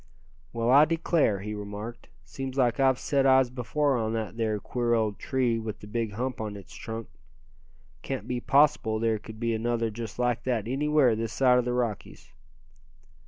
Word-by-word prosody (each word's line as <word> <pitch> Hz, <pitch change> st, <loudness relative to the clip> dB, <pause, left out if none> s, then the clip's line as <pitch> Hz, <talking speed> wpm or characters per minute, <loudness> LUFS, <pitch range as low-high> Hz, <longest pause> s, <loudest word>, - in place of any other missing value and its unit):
"Well, 115 Hz, +1 st, 0 dB
I 145 Hz, +3 st, +8 dB
declare," 160 Hz, -, +1 dB
he 105 Hz, +1 st, -5 dB
remarked, 105 Hz, +3 st, -7 dB, 0.2 s
"seems 130 Hz, -, -6 dB
like 120 Hz, -2 st, +2 dB
I've 130 Hz, -1 st, +4 dB
set 135 Hz, 0 st, +1 dB
eyes 130 Hz, -2 st, +5 dB
before 135 Hz, +3 st, 0 dB
on 110 Hz, -1 st, -1 dB
that 110 Hz, -1 st, -3 dB
there 110 Hz, -2 st, -1 dB
queer 120 Hz, +3 st, 0 dB
old 110 Hz, -3 st, -1 dB
tree 125 Hz, -3 st, 0 dB
with 110 Hz, -2 st, -6 dB
the -, -, -11 dB
big 110 Hz, 0 st, -3 dB
hump 125 Hz, +3 st, -3 dB
on 105 Hz, -2 st, -4 dB
its 100 Hz, -, -13 dB
trunk. 115 Hz, -1 st, -6 dB, 0.9 s
Can't 135 Hz, -1 st, -5 dB
be 125 Hz, -1 st, -2 dB
possible 135 Hz, -5 st, +3 dB
there 110 Hz, -1 st, 0 dB
could 110 Hz, +1 st, -11 dB
be 115 Hz, -1 st, 0 dB
another 115 Hz, 0 st, -1 dB
just 110 Hz, -1 st, -7 dB
like 125 Hz, -1 st, 0 dB
that 120 Hz, -5 st, -1 dB
anywhere 140 Hz, -2 st, +3 dB
this 115 Hz, 0 st, -3 dB
side 125 Hz, -2 st, +4 dB
the 125 Hz, -, -1 dB
Rockies." 110 Hz, -, -4 dB
115 Hz, 175 wpm, -27 LUFS, 110-130 Hz, 0.9 s, I